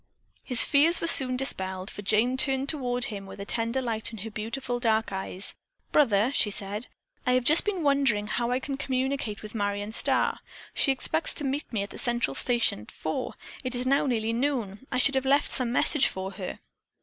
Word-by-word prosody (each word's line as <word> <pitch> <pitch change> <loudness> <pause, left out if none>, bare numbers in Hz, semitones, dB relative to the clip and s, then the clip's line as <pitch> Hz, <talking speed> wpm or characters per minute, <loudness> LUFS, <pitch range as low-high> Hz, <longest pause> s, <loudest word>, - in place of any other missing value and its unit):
His 250 -3 +6
fears 305 +4 +4
were - - -3
soon 255 -6 +10
dispelled, 190 -7 -3
for - - -8
Jane 220 +5 +1
turned 270 0 +1
toward 250 -5 -1
him 200 -3 -7
with 195 - -11
a 200 - -6
tender 230 +4 0
light 225 -2 -4
in 225 - -9
her 225 - -7
beautiful 245 +4 -4
dark 220 -3 0
eyes. 190 0 -5 0.4
"Brother," 235 -4 +2
she 215 - +2
said, 205 +3 -4 0.4
"I 250 - +3
have 255 -1 +1
just 310 +6 +4
been 390 -5 -2
wondering 275 -8 +1
how 235 +3 -2
I 250 +1 0
can 270 0 -5
communicate 260 -5 -3
with 215 - -9
Marion 205 -1 -3
Starr. - - 0 0.3
She 275 - +2
expects 315 +4 -2
to - - -6
meet 280 +2 -4
me 210 -4 -2
at 200 - -9
the - - -8
Central 240 - 0
Station 240 - +1
at 105 - -14
four. 155 - -5 0.3
It 255 -1 -1
is 245 +1 -1
now 275 +2 +1
nearly 225 -3 -1
noon. 240 -3 -3
I 255 - -1
should 275 +2 +3
have 265 -1 0
left 280 +2 +2
some 245 -2 +1
message 265 +3 +3
for 190 0 -6
her." 190 -2 -7
245 Hz, 205 wpm, -26 LUFS, 210-270 Hz, 0.4 s, soon